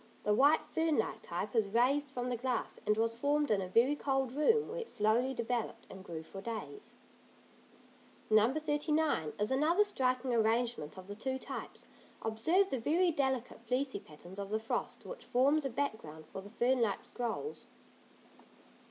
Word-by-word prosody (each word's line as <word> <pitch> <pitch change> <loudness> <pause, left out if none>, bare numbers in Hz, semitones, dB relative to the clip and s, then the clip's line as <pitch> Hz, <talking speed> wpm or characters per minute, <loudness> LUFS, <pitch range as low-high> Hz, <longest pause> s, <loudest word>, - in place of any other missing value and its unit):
The 210 - +2
white 285 +8 +5
fern 320 -2 +1
like 220 - -1
type 180 +4 -4
is 215 -3 +2
raised 265 +6 +2
from 250 -2 -3
the 245 - 0
glass, 245 0 -2
and 210 0 +3
was 225 +1 +1
formed 285 +4 +1
in 200 -2 +3
a 185 - -3
very 235 +9 +4
cold 270 -3 0
room 440 - +3
where 480 +3 -4
it 460 - -5
slowly 235 +5 +1
developed 235 -1 -2
and 190 - -10
grew 165 -3 -6
for 195 +4 -9
days. 230 - -6 1.3
No. 215 +2 +5
39 300 - 0
is 210 +4 0
another 315 +9 +4
striking 255 -9 0
arrangement 225 -7 +1
of 185 - -9
the 205 - -5
two 260 +4 -2
types; - - -7 0.4
observe 320 - +2
the 265 - 0
very 335 +9 +3
delicate 265 -6 -1
fleecy 255 +2 -1
patterns 175 +4 -11
of 200 0 -4
the 215 +1 0
frost 225 - -3
which - - -8
forms 280 +4 +3
a - - 0
background 220 - -4
for 190 - -8
the 200 - -11
fern 245 +3 +1
like 205 -4 0
scrolls. 245 - -4
245 Hz, 170 wpm, -33 LUFS, 215-290 Hz, 1.3 s, white